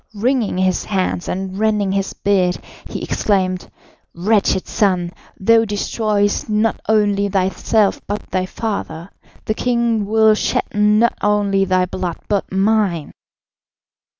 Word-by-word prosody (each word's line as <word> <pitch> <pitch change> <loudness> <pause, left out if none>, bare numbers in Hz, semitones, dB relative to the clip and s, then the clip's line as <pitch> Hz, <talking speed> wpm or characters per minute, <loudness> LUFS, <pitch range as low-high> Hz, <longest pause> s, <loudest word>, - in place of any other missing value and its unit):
Wringing 235 -2 0
his 185 -1 0
hands 185 -3 -1
and 190 +1 -4
rending 210 -3 +1
his 195 0 -1
beard, 185 -3 +1 0.3
he - - -5
exclaimed: 185 -3 -1 0.5
"Wretched 195 +1 +1
son! 180 -4 0 0.3
thou 225 +3 +4
destroyest 205 0 -1
not 215 +1 +1
only 205 -2 +2
thyself 195 +2 +1
but 205 +1 -5
thy 185 0 -1
father. 190 -5 -5 0.3
The 215 - 0
king 235 -3 0
will 220 0 +4
shed 215 - 0
not 210 +3 +3
only 205 -2 +2
thy 185 -1 +2
blood 180 -1 -4
but 200 -2 -1
mine." 195 -4 +1
200 Hz, 125 wpm, -18 LUFS, 190-215 Hz, 0.5 s, thou